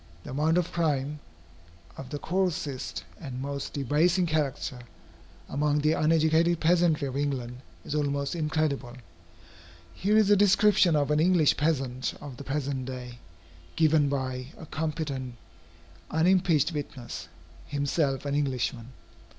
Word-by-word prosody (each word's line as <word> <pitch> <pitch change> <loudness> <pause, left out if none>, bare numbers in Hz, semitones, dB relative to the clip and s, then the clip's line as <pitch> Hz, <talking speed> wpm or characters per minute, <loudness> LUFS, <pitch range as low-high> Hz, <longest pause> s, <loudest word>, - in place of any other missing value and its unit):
The - - -8
amount 155 +5 +2
of 175 -1 0
crime, 150 -3 0 0.8
of 130 - -8
the 145 - -4
coarsest 165 -6 -2 0.2
and 130 -6 -6
most 140 +1 -4
debasing 155 +7 +2
character, 150 -4 -1 0.7
among 150 +1 +1
the 155 +1 +3
uneducated 160 +2 +3
peasantry 165 -3 +3
of 130 - -5
England, 135 -4 -2 0.3
is - - -4
almost 140 0 -1
incredible. 150 -6 -1 1.0
Here 205 - +2
is 210 -2 +4
a - - +8
description 200 -3 +4
of 145 0 +1
an 150 - +3
English 170 -2 +4
peasant 135 -5 -1
of 140 -4 -9
the 140 - -8
present 135 -1 -2
day, 125 -2 -7 0.6
given 155 -2 +3
by 130 -2 -3
a 160 - -9
competent 150 -5 -3 0.7
unimpeached 170 -2 +3
witness, 130 - -6 0.4
himself 145 -1 0
an 140 - -1
Englishman. 130 -3 -2
145 Hz, 125 wpm, -28 LUFS, 135-160 Hz, 1.0 s, a